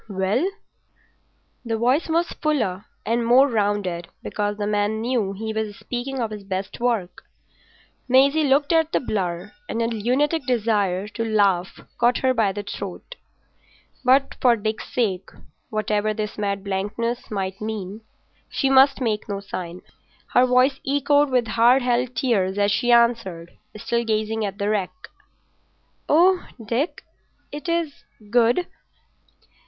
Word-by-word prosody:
"Well?" 200 Hz, -, 0 dB, 1.1 s
The 225 Hz, -2 st, -2 dB
voice 255 Hz, +9 st, +1 dB
was 335 Hz, +2 st, +1 dB
fuller 225 Hz, -, 0 dB, 0.2 s
and 235 Hz, +1 st, 0 dB
more 250 Hz, +4 st, +5 dB
rounded, 205 Hz, -7 st, -1 dB, 0.2 s
because 205 Hz, 0 st, -2 dB
the 205 Hz, -, -2 dB
man 210 Hz, +1 st, 0 dB
knew 225 Hz, -4 st, -1 dB
he 220 Hz, +2 st, -5 dB
was 215 Hz, -1 st, -3 dB
speaking 245 Hz, +4 st, -5 dB
of 225 Hz, -3 st, -2 dB
his 210 Hz, -1 st, -7 dB
best 195 Hz, 0 st, -5 dB
work. 230 Hz, -7 st, -1 dB, 0.9 s
Maisie 275 Hz, +4 st, +4 dB
looked 285 Hz, +3 st, +3 dB
at 325 Hz, -1 st, +2 dB
the -, -, +3 dB
blur, 180 Hz, -8 st, -3 dB, 0.2 s
and 230 Hz, -, -2 dB
a 230 Hz, -, +1 dB
lunatic 250 Hz, +7 st, 0 dB
desire 210 Hz, -5 st, +1 dB
to 230 Hz, +2 st, -4 dB
laugh 200 Hz, -5 st, +1 dB, 0.2 s
caught 240 Hz, +1 st, +3 dB
her 260 Hz, -1 st, +2 dB
by 220 Hz, -5 st, +2 dB
the 205 Hz, +1 st, -5 dB
throat. 200 Hz, -, -7 dB, 0.9 s
But 265 Hz, +2 st, +3 dB
for 245 Hz, -2 st, +5 dB
Dick's 215 Hz, 0 st, -4 dB
sake—whatever 215 Hz, 0 st, -2 dB
this 210 Hz, 0 st, -4 dB
mad 200 Hz, -2 st, -2 dB
blankness 210 Hz, +5 st, -3 dB
might 195 Hz, -2 st, -4 dB
mean—she 215 Hz, +5 st, -5 dB
must 270 Hz, 0 st, +5 dB
make 220 Hz, -3 st, -1 dB
no 200 Hz, -1 st, -2 dB
sign. 180 Hz, -3 st, -7 dB, 0.5 s
Her 250 Hz, +1 st, +5 dB
voice 255 Hz, +2 st, +3 dB
choked 285 Hz, +1 st, +2 dB
with 250 Hz, -2 st, +2 dB
hard 240 Hz, +4 st, +4 dB
held 245 Hz, 0 st, 0 dB
tears 205 Hz, -6 st, +1 dB
as 205 Hz, 0 st, +2 dB
she 240 Hz, +5 st, +1 dB
answered, 230 Hz, -8 st, +2 dB, 0.2 s
still 235 Hz, +3 st, -1 dB
gazing 220 Hz, 0 st, -1 dB
at 195 Hz, -1 st, -5 dB
the 200 Hz, -, -2 dB
wreck— 210 Hz, -, -3 dB, 1.0 s
"Oh, 355 Hz, +4 st, +4 dB, 0.2 s
Dick, 245 Hz, -, -2 dB, 0.5 s
it 295 Hz, +4 st, -6 dB
is 335 Hz, -4 st, -2 dB, 0.3 s
good!" 240 Hz, +8 st, +3 dB
225 Hz, 135 wpm, -23 LUFS, 205-255 Hz, 1.1 s, more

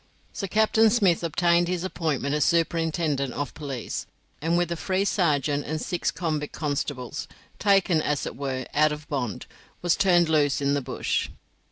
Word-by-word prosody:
So 195 Hz, -, -4 dB
Captain 220 Hz, +2 st, +4 dB
Smith 200 Hz, -7 st, +3 dB
obtained 170 Hz, +1 st, +2 dB
his 180 Hz, -1 st, -2 dB
appointment 155 Hz, -7 st, -1 dB
as 150 Hz, -, +2 dB
superintendent 165 Hz, -5 st, +1 dB
of 145 Hz, -2 st, -4 dB
police, 135 Hz, -6 st, -5 dB, 0.3 s
and 165 Hz, +2 st, +1 dB
with 175 Hz, -1 st, 0 dB
a -, -, 0 dB
free 190 Hz, +3 st, -1 dB
sergeant 145 Hz, -7 st, +1 dB
and 155 Hz, +1 st, -3 dB
six 175 Hz, +2 st, -1 dB
convict 155 Hz, -4 st, -3 dB
constables, 145 Hz, -3 st, -3 dB, 0.3 s
taken, 195 Hz, -5 st, +3 dB
as 150 Hz, -2 st, -1 dB
it -, -, -5 dB
were, 130 Hz, -2 st, -3 dB
out 155 Hz, +1 st, +4 dB
of 150 Hz, 0 st, -6 dB
bond, 125 Hz, -, -3 dB, 0.4 s
was 175 Hz, -2 st, +3 dB
turned 180 Hz, -3 st, +4 dB
loose 150 Hz, -3 st, +2 dB
in 140 Hz, 0 st, +1 dB
the 145 Hz, -, +1 dB
bush. -, -, -2 dB
160 Hz, 165 wpm, -26 LUFS, 145-175 Hz, 0.4 s, Captain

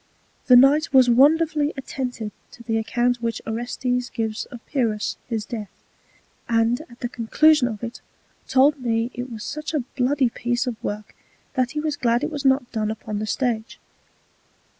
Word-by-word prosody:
The 250 Hz, -, +8 dB
Knight 280 Hz, +5 st, +5 dB
was 255 Hz, -2 st, +7 dB
wonderfully 300 Hz, +3 st, +4 dB
attentive 250 Hz, -5 st, -4 dB, 0.2 s
to 235 Hz, -, -13 dB
the 225 Hz, -1 st, 0 dB
Account 240 Hz, +2 st, +1 dB
which 230 Hz, -1 st, -2 dB
Orestes 245 Hz, +2 st, -2 dB
gives 220 Hz, -1 st, -3 dB
of 240 Hz, -2 st, -12 dB
Pyrrhus 225 Hz, -7 st, -1 dB
his 225 Hz, -3 st, -3 dB
Death, 215 Hz, -4 st, -6 dB, 0.8 s
and 230 Hz, +3 st, +2 dB
at 240 Hz, -, -16 dB
the 240 Hz, -, -1 dB
Conclusion 255 Hz, +4 st, +3 dB
of 220 Hz, -2 st, -6 dB
it, 235 Hz, 0 st, -6 dB, 0.5 s
told 275 Hz, +2 st, +4 dB
me 230 Hz, -1 st, 0 dB
it 250 Hz, +1 st, -5 dB
was 220 Hz, -2 st, -7 dB
such 305 Hz, +2 st, -4 dB
a 285 Hz, -, 0 dB
bloody 260 Hz, -1 st, +2 dB
Piece 240 Hz, +4 st, -1 dB
of 245 Hz, -3 st, -5 dB
Work, 210 Hz, +1 st, -5 dB, 0.4 s
that 255 Hz, -1 st, 0 dB
he 300 Hz, -, -2 dB
was 300 Hz, -1 st, -2 dB
glad 235 Hz, 0 st, +1 dB
it -, -, -1 dB
was 290 Hz, -1 st, -4 dB
not 265 Hz, -2 st, +2 dB
done 215 Hz, -2 st, -1 dB
upon 215 Hz, -1 st, -4 dB
the 215 Hz, -, -3 dB
Stage. 230 Hz, -1 st, -2 dB
245 Hz, 170 wpm, -23 LUFS, 225-270 Hz, 0.8 s, The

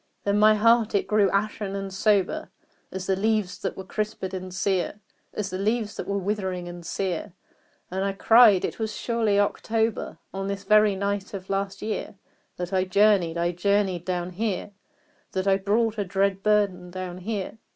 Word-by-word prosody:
Then 200 Hz, 0 st, +1 dB
my 215 Hz, 0 st, +6 dB
heart 230 Hz, 0 st, +3 dB
it 200 Hz, -, +2 dB
grew 210 Hz, -2 st, +3 dB
ashen 200 Hz, 0 st, -1 dB
and 195 Hz, -1 st, -5 dB
sober 200 Hz, -1 st, +1 dB, 0.4 s
As 190 Hz, -1 st, -5 dB
the 190 Hz, -, +1 dB
leaves 210 Hz, -1 st, 0 dB
that 190 Hz, -, -4 dB
were 190 Hz, -, -5 dB
crisped 195 Hz, -1 st, -4 dB
and 185 Hz, 0 st, -5 dB
sere 190 Hz, +1 st, -1 dB, 0.3 s
As 200 Hz, -3 st, -4 dB
the 185 Hz, -, -3 dB
leaves 215 Hz, +1 st, 0 dB
that -, -, -5 dB
were 200 Hz, -, -1 dB
withering 190 Hz, -3 st, -2 dB
and 175 Hz, 0 st, -8 dB
sere; 180 Hz, +2 st, -3 dB, 0.6 s
And 190 Hz, +1 st, -1 dB
I 195 Hz, 0 st, 0 dB
cried 220 Hz, -1 st, +6 dB
"It -, -, -5 dB
was 220 Hz, -1 st, -3 dB
surely 225 Hz, -4 st, +1 dB
October 220 Hz, +2 st, 0 dB, 0.2 s
On 195 Hz, 0 st, -3 dB
this 200 Hz, 0 st, -4 dB
very 210 Hz, 0 st, +4 dB
night 200 Hz, 0 st, -2 dB
of 190 Hz, 0 st, -7 dB
last 195 Hz, 0 st, -2 dB
year 215 Hz, -1 st, -4 dB, 0.4 s
That 180 Hz, +1 st, -4 dB
I 185 Hz, -1 st, +3 dB
journeyed 185 Hz, -3 st, +3 dB
I 170 Hz, +1 st, +1 dB
journeyed 190 Hz, -1 st, +1 dB
down 180 Hz, -1 st, -2 dB
here 205 Hz, +1 st, -2 dB, 0.6 s
That 190 Hz, +1 st, -1 dB
I 195 Hz, 0 st, +4 dB
brought 215 Hz, +3 st, 0 dB
a -, -, +1 dB
dread 195 Hz, +1 st, 0 dB
burden 200 Hz, -4 st, +1 dB
down 185 Hz, 0 st, -6 dB
here! 210 Hz, +2 st, -4 dB
195 Hz, 180 wpm, -25 LUFS, 185-210 Hz, 0.6 s, my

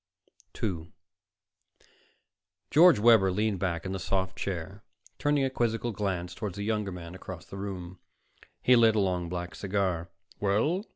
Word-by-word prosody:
2 90 Hz, -4 st, -3 dB, 1.8 s
George 165 Hz, 0 st, +7 dB
Webber 105 Hz, -3 st, +5 dB
leaned 105 Hz, 0 st, 0 dB
back 85 Hz, -3 st, -2 dB
in 95 Hz, -, -3 dB
the 95 Hz, -, -3 dB
soft 95 Hz, 0 st, -1 dB
chair, 95 Hz, +2 st, -5 dB, 0.4 s
turning 145 Hz, -1 st, +2 dB
a 135 Hz, -, +1 dB
quizzical 120 Hz, -1 st, 0 dB
glance 95 Hz, -4 st, -3 dB
toward 100 Hz, -2 st, -5 dB
the 100 Hz, -, -4 dB
younger 105 Hz, -2 st, -1 dB
man 85 Hz, -1 st, -8 dB
across 95 Hz, -2 st, -8 dB
the -, -, -10 dB
room. 90 Hz, -3 st, -6 dB, 0.6 s
He 125 Hz, -, +6 dB
lit 115 Hz, -2 st, +5 dB
a -, -, +3 dB
long 90 Hz, -3 st, 0 dB
black 90 Hz, 0 st, -4 dB
cigar. 95 Hz, -4 st, -1 dB, 0.3 s
"Well?" 115 Hz, -, +1 dB
95 Hz, 150 wpm, -29 LUFS, 90-110 Hz, 1.8 s, George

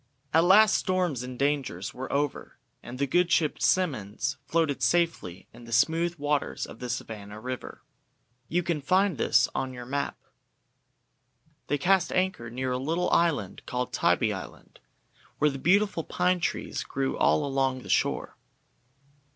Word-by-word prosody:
AT 165 Hz, +1 st, +5 dB
last 205 Hz, +4 st, +6 dB
storms 180 Hz, -, 0 dB
and 125 Hz, 0 st, -7 dB
dangers 135 Hz, -9 st, -1 dB
were 130 Hz, +1 st, -6 dB
over, 145 Hz, 0 st, -2 dB, 0.2 s
and 120 Hz, +1 st, -8 dB
the 140 Hz, -, +1 dB
good 175 Hz, +6 st, +2 dB
ship 155 Hz, -3 st, +1 dB
"Simmonds" 130 Hz, -, 0 dB
floated 160 Hz, -4 st, 0 dB
safely 165 Hz, -, 0 dB
in 120 Hz, +1 st, -13 dB
the 115 Hz, -, -11 dB
smooth 165 Hz, +8 st, +2 dB
waters 145 Hz, -1 st, -1 dB
of -, -, -12 dB
the 125 Hz, -, -5 dB
Savannah 105 Hz, -3 st, -6 dB
river. 130 Hz, +2 st, -7 dB, 0.6 s
You 175 Hz, +2 st, 0 dB
can 165 Hz, -3 st, -1 dB
find 185 Hz, -, +2 dB
this 125 Hz, +2 st, +4 dB
on 130 Hz, -1 st, -3 dB
your 125 Hz, -1 st, -8 dB
map. 140 Hz, +3 st, -3 dB, 1.5 s
They 145 Hz, -, +1 dB
cast 185 Hz, +5 st, +2 dB
anchor 185 Hz, -11 st, -1 dB
near 130 Hz, +2 st, -3 dB
a 125 Hz, -, -1 dB
little 165 Hz, +6 st, -1 dB
island 150 Hz, -, +1 dB
called 125 Hz, 0 st, -3 dB
Tybee -, -, +2 dB
Island, -, -, -10 dB, 0.6 s
where 150 Hz, 0 st, +3 dB
beautiful 190 Hz, +4 st, +2 dB
pine 180 Hz, +2 st, +1 dB
trees -, -, -2 dB
grew 135 Hz, -1 st, -2 dB
all 150 Hz, -, +2 dB
along 135 Hz, -2 st, 0 dB
the -, -, -11 dB
shore. -, -, 0 dB
140 Hz, 150 wpm, -27 LUFS, 125-175 Hz, 1.5 s, last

